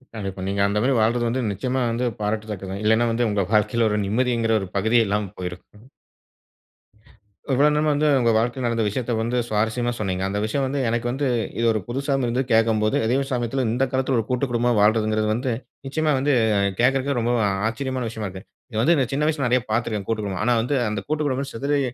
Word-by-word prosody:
கண்டிப்பா. 95 -3 -5
நீங்க 100 0 -1
அந்த 100 +1 0
மாரி 135 - +2
வாழ்றது 120 +2 +2
வந்து 125 +3 -1
நிச்சயமா 125 +7 -2
வந்து 120 +2 -1
பாராட்டத்தக்கது. 105 -2 -3
இல்லைனா 110 +2 +3
வந்து 120 +1 +1
உங்க 105 -1 +1
வாழ்க்கைல 110 +1 +2
ஒரு 105 - 0
நிம்மதின்கிற 115 +1 +1
ஒரு 95 - -5
பகுதியே 110 +4 +3
இல்லாம 100 -1 -1
போயிருக்கும். 90 +4 -8 1.7
இவ்வளவு 145 +3 +4
நேரமா 150 +1 +2
வந்து 150 +1 +1
ஒங்க 120 -2 +3
வாழ்க்கையில 120 +3 -1
நடந்த 115 -1 0
விஷயத்த 120 +3 -2
வந்து 120 +2 -1
சுவாரசியமா 115 +3 0
சொன்னீங்க. 95 -2 -2
அந்த 100 +1 -2
விஷயம் 135 +6 -1
வந்து 135 +2 -2
எனக்கு 115 +1 -1
வந்து, 135 +3 -1 0.3
இது 115 - 0
ஒரு 110 - 0
புதுசாவும் 135 +1 -1
இருந்தது 125 +2 -1
கேக்கும்போது 110 -1 +3
அதயும் 135 +4 +1
சமயத்துல 125 +1 -1
இந்த 125 +4 0
காலத்துல 130 -1 0
ஒரு 110 - -2
கூட்டு 125 +2 0
குடும்பமா 120 +1 +1
வாழ்றதுங்கறது 110 0 +2
வந்து, 125 +3 -1 0.3
நிச்சயமா 155 +3 0
வந்து 140 +1 +1 0.5
கேக்குறதுக்கே 135 +3 +2
ரொம்ப 120 +1 0 0.3
ஆச்சரியமான 130 +1 -3
விஷயமா 110 -2 -5
இருக்கு. 95 +1 -10 0.3
இத 110 - -5
வந்து 165 +9 +4 0.2
சின்ன 145 +2 0
வயசுல 150 -4 0
நறைய 125 0 +2
பாத்திருக்கேன், 110 -3 -1
கூட்டு 110 -1 0
குடும்பம். 100 0 -3
ஆனா, 120 - +3
வந்து 135 +5 -1
அந்த 105 -1 -2
கூட்டு 155 0 -1
குடும்பம் 135 0 -2
சிதறி 140 +5 0
115 Hz, 190 wpm, -23 LUFS, 110-130 Hz, 1.7 s, இவ்வளவு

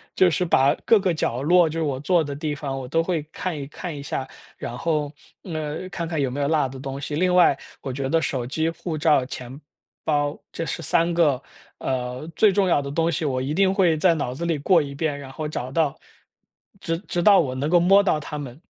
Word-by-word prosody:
就 185 -1 +5
是 170 +3 0
把 140 -4 +4
各 225 - +6
个 185 -3 +1
角 125 -5 -1
落， 170 +2 +4
就 165 +2 -4
是 - - 0
我 135 -3 -1
坐 170 +2 +2
的 140 -1 -5
地 150 0 -3
方， 140 -2 -4
我 130 -1 -6
都 165 +5 +1
会 165 -3 -1
看 180 -4 -4
一 140 - -5
看 165 +1 -6
一 140 - -7
下， 135 -1 -3 0.3
然 120 - -6
后， 150 -2 -1 0.3
呃， 155 0 -4
看 170 -3 -4
看 160 -3 -2
有 135 -2 +1
没 135 +3 -5
有 140 - +1
落 155 -4 +2
的 130 0 -9
东 135 0 -5
西。 145 +1 -4
另 180 +2 +2
外 175 -6 +5 0.2
我 135 - -4
觉 135 0 -2
得 165 0 +2
手 125 -3 -2
机、 160 +5 -1
护 165 -1 -5
照、 150 -4 +3
钱 130 +2 -8 0.4
包 145 -1 0
这 165 - -4
是 - - -4
3 170 +1 +1
个， 145 -6 +2 0.4
呃， 125 +2 -3
最 210 -2 +5
重 195 0 +2
要 155 -5 +3
的 140 0 -5
东 165 +2 +1
西， 160 - -2
我 130 -2 0
一 140 +3 -2
定 190 +2 +3
会 175 -5 +3
在 170 +2 +4
脑 125 -4 -2
子 170 +5 -4
里 165 -3 0
过 165 +3 +4
一 140 -1 -5
遍， 145 0 -2
然 135 -2 -9
后 155 +3 -4
找 130 -4 -4
到 155 -2 +1 0.8
直 165 -1 -1
直 175 -2 -1
到 200 -2 +7
我 130 -6 0
能 145 +4 -1
够 175 - +5
摸 195 +4 +6
到 160 -5 +2
它 150 0 -6
们 140 -1 -7
150 Hz, 255 characters per minute, -23 LUFS, 140-170 Hz, 0.8 s, 到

